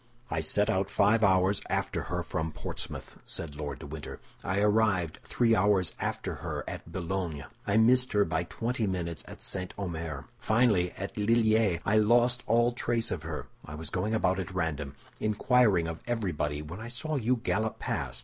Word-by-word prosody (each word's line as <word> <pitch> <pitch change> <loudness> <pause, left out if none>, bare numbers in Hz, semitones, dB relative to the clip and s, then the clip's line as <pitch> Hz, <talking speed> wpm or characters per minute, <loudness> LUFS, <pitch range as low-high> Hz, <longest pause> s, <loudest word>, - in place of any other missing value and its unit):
"I 80 - 0
set 105 +6 +3
out 95 +1 +1
five 110 +3 +3
hours 95 0 +4
after - - -1
her - - -1
from 80 0 -2
Portsmouth," 80 - -6
said 75 -3 -5
Lord 75 -3 -4
de - - -9
Winter. 75 +1 -7 0.2
"I 95 - -1
arrived 105 -6 +2
three 115 -2 +2
hours 95 -3 +3
after - - -2
her - - -3
at 85 - -7
Boulogne. 85 -4 -3 0.2
I 100 - +3
missed 125 +3 +4
her 105 -1 +4
by 80 +1 -1
twenty 115 +4 -2
minutes 85 -4 -3
at - - -9
St. 90 -1 -4
Omer. 80 -7 -4
Finally, 110 -6 +3
at 100 +2 -5
Lilliers 110 -4 +3
I 105 +2 +3
lost 120 +3 +4
all 120 +2 +4
trace 120 -1 0
of 85 - -2
her. 80 -1 -5 0.2
I 75 - -8
was 80 +1 -5
going 105 +5 0
about 95 -3 +2
at 95 0 -5
random, 75 -5 -2 0.2
inquiring 105 -4 +3
of 85 -1 -5
everybody, 80 -11 -1
when 85 +6 -8
I 110 - -6
saw 150 +6 -2
you 125 -1 +2
gallop 110 -1 -1
past. - - -2
95 Hz, 180 wpm, -29 LUFS, 85-110 Hz, 0.2 s, hours